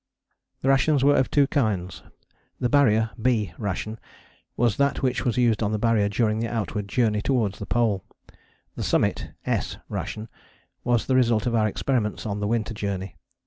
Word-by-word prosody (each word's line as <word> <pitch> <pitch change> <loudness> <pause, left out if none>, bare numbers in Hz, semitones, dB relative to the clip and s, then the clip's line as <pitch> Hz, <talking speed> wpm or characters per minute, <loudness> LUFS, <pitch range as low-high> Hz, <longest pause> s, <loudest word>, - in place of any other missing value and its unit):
The - - 0
rations 135 +1 +3
were 145 +1 +5
of 130 - +2
two 145 -1 +4
kinds. 105 - -1 0.6
The 125 - 0
Barrier 115 -5 +3
(B) 110 -6 +1
ration 105 +2 -3 0.6
was 120 -3 +2
that 140 0 +1
which 130 -2 0
was 120 -2 0
used 120 -3 +2
on 105 -1 0
the - - +1
Barrier 110 -2 +2
during 110 0 +1
the 115 - -1
outward 105 -3 -3
journey 105 -1 +1
towards 115 -5 0
the 105 - -6
Pole. 110 -3 +1 0.7
The - - -5
Summit - - 0 0.2
(S) - - -1
ration 110 +1 -4 0.6
was 120 -2 +1
the 130 - +1
result 115 -4 +3
of 120 - 0
our 110 -2 +3
experiments 110 -1 -1
on 105 -1 -2
the 105 - -1
Winter 115 -1 -1
Journey. 100 -2 -4
115 Hz, 175 wpm, -25 LUFS, 105-125 Hz, 0.7 s, were